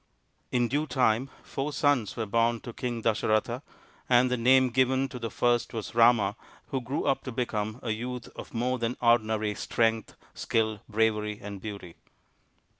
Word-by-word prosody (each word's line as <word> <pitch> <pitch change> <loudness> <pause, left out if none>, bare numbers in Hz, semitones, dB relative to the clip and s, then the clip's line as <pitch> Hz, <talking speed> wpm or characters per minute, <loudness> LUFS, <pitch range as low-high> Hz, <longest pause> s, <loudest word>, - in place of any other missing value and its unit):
In 120 -1 +2
due 145 +6 -1
time 125 0 +2
four 140 +2 -3
sons 145 -9 +1
were 115 - -1
born 115 +2 +1
to 120 - -8
King 120 -2 -4
Dasa 110 -2 +1
ratha, 115 +4 +1 0.5
and 125 0 +4
the - - +3
name 130 +1 +4
given 130 +2 +2
to 125 - -7
the 115 -1 -3
first 120 0 +1
was 110 - -5
Rama, 115 -4 +4 0.3
who 135 - -2
grew 130 +4 -3
'up 135 - +1
to 130 - -4
become 110 -2 -2
a 115 - -1
youth 120 +2 -4
of - - -9
more 125 +2 -1
than 115 +1 -2
ordinary 110 -3 +2
strength, 115 0 0 0.2
skill, 110 -2 0
bravery, 105 -1 +1
and 100 -1 -8
beauty. 100 -5 -8
115 Hz, 170 wpm, -28 LUFS, 110-125 Hz, 0.5 s, and